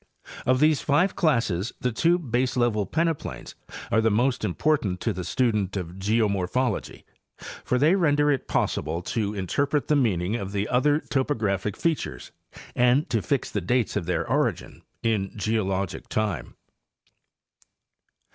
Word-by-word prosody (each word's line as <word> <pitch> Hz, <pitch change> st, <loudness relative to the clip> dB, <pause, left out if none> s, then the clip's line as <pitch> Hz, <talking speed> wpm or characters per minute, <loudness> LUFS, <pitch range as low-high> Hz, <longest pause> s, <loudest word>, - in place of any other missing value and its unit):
Of 130 Hz, 0 st, +3 dB
these 155 Hz, -1 st, +3 dB
five 170 Hz, +7 st, +2 dB
classes 115 Hz, -, +1 dB
the 125 Hz, -, 0 dB
two 165 Hz, +9 st, +3 dB
baselevel 120 Hz, -, 0 dB
peneplains 165 Hz, -1 st, -2 dB, 0.4 s
are 110 Hz, -1 st, +4 dB
most 120 Hz, +4 st, +1 dB
important 105 Hz, -, 0 dB
to 115 Hz, -, 0 dB
the 90 Hz, 0 st, -5 dB
student 105 Hz, -4 st, 0 dB
of 90 Hz, -1 st, -6 dB
geomorphology, 105 Hz, +2 st, 0 dB, 0.6 s
for 125 Hz, -, +1 dB
they 150 Hz, +7 st, +4 dB
render 145 Hz, -5 st, +3 dB
it 135 Hz, -, -2 dB
possible 85 Hz, +2 st, -1 dB
to 105 Hz, +1 st, -2 dB
interpret 140 Hz, -, -1 dB
the 150 Hz, -, +4 dB
meaning 105 Hz, -7 st, +1 dB
of 100 Hz, -2 st, -6 dB
the 100 Hz, +1 st, -1 dB
other 145 Hz, +5 st, +2 dB
topographie 105 Hz, -8 st, -1 dB
fea 165 Hz, -, +2 dB
tures 65 Hz, -, -7 dB, 0.4 s
and 125 Hz, +5 st, +3 dB
to 115 Hz, -, +1 dB
fix 140 Hz, +6 st, -1 dB
the 105 Hz, -, -1 dB
dates 120 Hz, +5 st, 0 dB
of 85 Hz, -, -2 dB
their 90 Hz, -, -1 dB
origin -, -, -1 dB, 0.2 s
in 105 Hz, -4 st, 0 dB
geologic 100 Hz, -3 st, -2 dB
time. 110 Hz, -3 st, -2 dB
115 Hz, 135 wpm, -25 LUFS, 100-140 Hz, 0.6 s, are